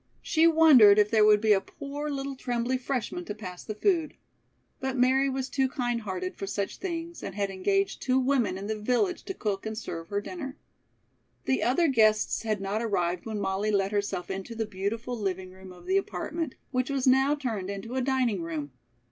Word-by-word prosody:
She 320 +1 +4
wondered 295 -11 +7
if 210 0 +4
there 220 -2 +5
would 210 -1 +5
be 215 -1 +5
a 195 - +2
poor 290 +6 -6
little 275 -1 -3
trembly 245 -1 -1
freshman 250 -8 -3
to 210 - -5
pass 185 -4 -8
the 215 - -5
food. 330 - +1 0.6
But 265 0 -2
Mary 260 +2 +3
was 265 -1 -2
too 265 -1 0
kind 245 -3 -1
hearted 185 -3 -4
for 195 - -5
such 200 0 -3
things 340 -2 -5
and 190 - -6
had 200 -1 -1
engaged 390 - 0
two 255 0 +2
women 255 -8 +1
in 195 - -6
the 215 0 -3
village 250 - +1
to 385 - -5
cook 200 -3 -2
and 220 0 -5
serve 165 -6 -6
her 200 -1 0
dinner. 275 - -7 0.9
The 265 - +1
other 275 +8 +3
guests 215 -5 +3
had 215 -2 -1
not 195 +3 -2
arrived 180 -4 -1
when 215 -2 -3
Molly 195 +1 -1
let 200 -1 +1
herself 200 -3 -2
into 195 +4 -5
the 225 0 -1
beautiful 215 +4 -3
living 190 -4 -3
room 190 0 -12
of 180 - -14
the 380 +1 +2
apartment, 335 -6 -3 0.2
which 255 0 0
was 275 -2 -1
now 265 +3 +4
turned 225 -10 -3
into 200 +4 -6
a 260 - 0
dining 250 -7 +1
room. 155 -4 -4
225 Hz, 200 wpm, -28 LUFS, 200-270 Hz, 0.9 s, wondered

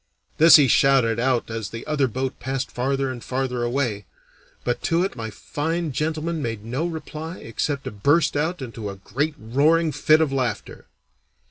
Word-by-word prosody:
This 165 +2 +9
he 145 -3 +7
shouted 125 -3 +3
out 125 -2 0
as 110 -3 -4
the 115 +1 -8
other 150 -3 +1
boat 130 +2 -3
passed 135 +2 -3
farther 135 +1 -1
and 120 -2 -8
farther 130 -1 -2
away, 120 -5 -1 0.6
but 120 - -1
to 170 +1 +2
it 190 - -3
my 115 -3 -5
fine 160 - -3
gentleman 160 +3 -2
made 115 -4 -4
no 130 +9 -2
reply 160 +1 -6
except 140 +5 -3
to - - -5
burst 145 +11 +2
out 155 +1 -1
into 115 -4 -6
a 100 - -6
great 140 +11 -2
roaring 150 +8 +2
fit 155 +2 +4
of 155 -4 +1
laughter. 130 -3 -3
135 Hz, 170 wpm, -23 LUFS, 120-155 Hz, 0.6 s, This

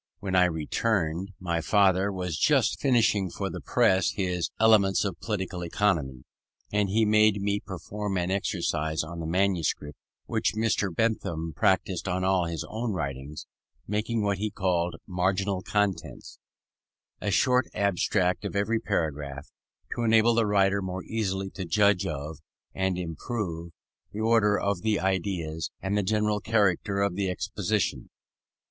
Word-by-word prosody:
When 95 -1 -2
I 90 -1 +6
returned, 85 +2 -1
my 85 -2 -1
father 95 +2 +3
was 90 -4 -3
just - - +2
finishing 110 -7 +3
for - - -4
the - - -6
press 95 0 +3
his 90 -3 -1
Elements 105 -3 +4
of 95 -4 -3
Political 95 -4 -3
Economy, 80 -9 0 0.5
and 105 -1 +2
he 110 +3 +3
made 105 -1 +4
me 100 +1 0
perform 100 +1 -5
an 90 +1 -1
exercise 85 -6 -1
on 85 +2 -7
the 80 - -4
manuscript, 85 -5 0 0.3
which - - 0
Mr. 110 -2 +1
Bentham 85 -6 -1
practised 95 -1 +1
on 90 +1 -1
all 95 -2 +2
his 85 -2 -4
own 115 0 -3
writings, 70 -2 -5 0.4
making 105 +2 -1
what 100 -2 0
he 110 +1 -1
called 90 -4 0
"marginal 95 +1 0
contents"; 95 - -2 0.8
a 105 - -1
short 125 +6 +3
abstract 95 -1 +1
of 100 - -4
every 110 +3 +1
paragraph, 75 -8 -3 0.4
to - - -4
enable 115 0 +4
the 115 -2 +2
writer 100 -1 +3
more 95 0 -4
easily 95 -3 -2
to 95 - -6
judge 100 +2 +2
of, 75 0 -5 0.3
and 95 -1 -1
improve, 85 -1 -4 0.4
the 105 - -6
order 110 -2 +3
of 100 -3 -1
the 110 -1 +1
ideas, 90 -4 -2
and 95 +1 -2
the 105 - +2
general 105 +1 +1
character 100 -2 +1
of 100 -2 0
the 95 0 -1
exposition. 100 +3 -2
95 Hz, 145 wpm, -27 LUFS, 85-105 Hz, 0.8 s, I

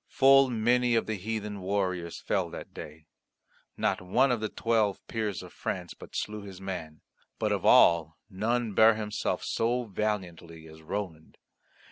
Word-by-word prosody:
Full 135 0 +5
many 120 +1 +2
of 115 - +2
the 110 - -2
heathen 105 0 -4
warriors 95 -3 -2
fell - - -1
that - - -9
day. 75 0 -10 0.7
Not - - 0
one 125 +9 +2
of 120 - +1
the 110 0 -3
Twelve 110 -4 0
Peers 110 -4 -3
of - - -12
France 90 -2 -4
but - - -13
slew 105 0 -3
his 95 -2 -10
man. 90 -5 -6 0.4
But - - -1
of - - 0
all 80 -2 +5
none 110 +3 -1
bare 110 +2 +6
himself 105 -1 -2
so 120 +2 0
valiantly 90 -6 -4
as 80 0 -14
Roland. 80 -2 -6
105 Hz, 155 wpm, -28 LUFS, 90-115 Hz, 0.7 s, bare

